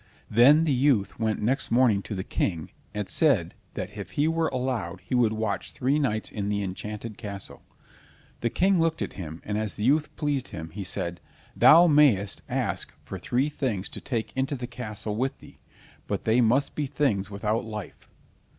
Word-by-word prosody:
Then 140 +8 +7
the 155 -4 +2
youth 125 -7 +2
went 110 -2 0
next 130 +6 0
morning 115 -4 +4
to 105 - -6
the 95 - -3
King, 85 -5 -2 0.2
and 105 -2 -3
said - - +2 0.2
that 100 - -5
if 95 -3 -7
he 145 +2 +2
were 165 0 +1
allowed 125 - -2
he - - -7
would 120 -3 +4
watch 110 -1 -2
three 135 +4 +1
nights 110 -7 -1
in 100 -1 -3
the 100 0 0
enchanted 105 +3 -6
castle. 100 -4 -7 0.8
The 120 - 0
King 190 - +3
looked 165 0 +1
at - - -5
him, 80 -3 -7
and 105 0 -1
as 110 -2 -3
the 105 - -4
youth 150 +5 +2
pleased 145 -4 -1
him, 80 0 -7
he 100 +4 -5
said: 85 -2 -4 0.3
"Thou 170 +3 +8
mayst 145 - +4
ask - - -2
for - - -7
three 130 +4 0
things 115 -10 -2
to - - -8
take 115 -4 -3
into 135 +2 0
the 125 -2 -5
castle 110 -4 -5
with 130 +4 -1
thee, - - -16 0.5
but - - -3
they 115 +3 +4
must 125 +5 +2
be 150 -2 -2
things 125 -9 0
without 105 +3 -1
life." 105 -3 -8
115 Hz, 185 wpm, -26 LUFS, 100-135 Hz, 0.8 s, Thou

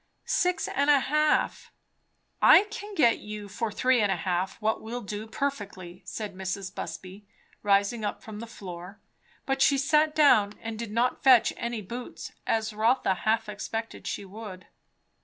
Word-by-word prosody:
"Six 360 0 +1
and 285 +1 0
a 290 -1 +7
half." 305 +3 +1 0.7
"I - - +8
can 420 -2 -7
get 240 -9 +4
you 210 -1 -7
for 210 +3 -3
three 250 +3 +2
and 205 -2 +2
a - - +2
half 180 +1 -2
what 220 0 0
will 240 +3 -5
do 210 +1 -6
perfectly," 200 -9 -4
said 210 -3 -5
Mrs. 190 0 -4
Busby, 195 +2 -8 0.3
rising 200 +2 +2
up 205 - -3
from 215 -1 -8
the 230 - -7
floor. 185 -2 -9 0.5
But 270 0 -1
she 280 - +5
sat 300 +2 +2
down, 215 -9 +5
and 225 -1 -6
did 235 -2 -4
not 235 +3 0
fetch 255 -4 +6
any 235 -2 -4
boots, 240 +6 -7 0.2
as 220 -1 0
Rotha 225 0 +2
half 220 +4 0
expected 225 +2 -5
she 200 - -4
would. 195 -2 -9
220 Hz, 160 wpm, -27 LUFS, 200-255 Hz, 0.7 s, I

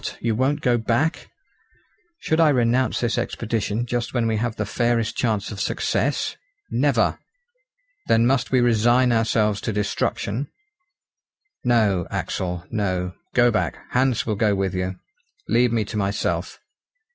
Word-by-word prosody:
you 115 -1 0
won't 135 +6 0
go 120 -1 +2
back?" 120 +9 0 0.9
"Should 160 - -1
I 160 -2 +6
renounce 125 -2 +2
this 120 0 0
expedition 115 -1 -2
just 120 +1 -3
when 120 -2 +1
we 110 -1 +1
have 115 +1 -2
the 105 - -2
fairest 120 +1 0
chance 110 -5 -1
of 100 -3 -5
success! - - -1 0.3
Never!" - - +2 0.9
"Then 115 +1 +4
must 130 +1 +2
we 130 -2 +3
resign 120 +2 +3
ourselves 110 -2 +1
to - - -2
destruction?" 105 +4 -2 1.2
"No, 110 -8 +2
Axel, 90 -1 -3
no; 95 -4 -1 0.2
go 120 -1 +5
back. 105 - -1
Hans 130 -1 +1
will 110 - 0
go 105 -1 +2
with 95 -1 -1
you. 95 0 -2 0.5
Leave 120 0 +3
me 115 -2 0
to 105 - -5
myself!" 100 0 -1
115 Hz, 140 wpm, -23 LUFS, 105-120 Hz, 1.2 s, I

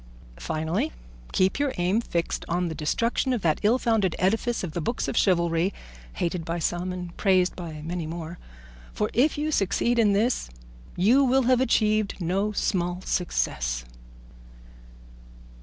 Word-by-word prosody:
Finally, 160 - -1 0.4
keep 185 +6 +2
your 285 -2 0
aim 185 +6 +2
fixed 170 -7 -2
on 175 0 0
the - - -4
destruction 230 - 0
of 235 - -2
that 160 -3 +2
ill 220 +4 +4
founded 220 -8 +1
edifice 225 +5 0
of 175 - -3
the 170 - -3
books 235 +10 -2
of - - -3
chivalry, 170 -1 +2 0.4
hated 170 0 -2
by 165 +2 -3
some 175 +2 -1
and 180 -1 -6
praised 185 -2 +3
by 160 -4 -7
many 170 0 -4
more; 165 +1 -6 0.5
for - - -1
if 280 +7 +3
you 305 +1 -1
succeed 235 +1 +1
in 210 -3 +4
this 220 - +1 0.5
you 235 +10 +4
will 265 0 +3
have 255 +1 +3
achieved 215 -4 +2
no 195 +4 0
small 180 -3 -1
success." - - -1
185 Hz, 150 wpm, -26 LUFS, 170-230 Hz, 0.5 s, ill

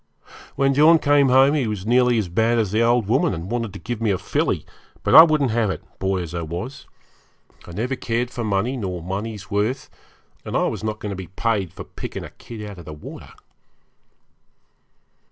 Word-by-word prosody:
When 135 0 +2
John 155 +4 +6
came 145 -3 +3
home 135 +3 +5
he 140 -6 +1
was 105 -3 -4
nearly 125 +1 +3
as 105 -4 0
bad 110 +7 +1
as 110 -5 0
the 110 +2 +2
old 120 -1 +3
woman, 115 -4 +2
and 85 +5 -7
wanted 115 -3 -2
to - - -7
give 115 +2 -5
me 115 - +1
a 95 - +2
filly, - - -1 0.4
but - - +1
I - - +13
wouldn't 155 -6 +3
have 110 -2 +1
it, 95 - -4 0.2
boy 95 -1 0
as 85 -1 -8
I 85 - -3
was. 90 - -6 0.8
I - - -9
never 125 +7 -2
cared 120 0 -2
for 120 -2 -4
money 105 +5 0
nor 90 -6 -4
money's 100 +2 -5
worth, 105 +7 -1 0.5
and - - -2
I - - +2
was - - -2
not 110 -1 -2
going 105 -1 -5
to - - -4
be 95 -2 -7
paid 100 -1 -1
for - - -9
picking - - -7
a - - -9
kid 110 -3 -9
out 100 -3 -9
of 85 - -11
the 75 - -8
water. 75 - -10
110 Hz, 210 wpm, -22 LUFS, 95-125 Hz, 0.8 s, I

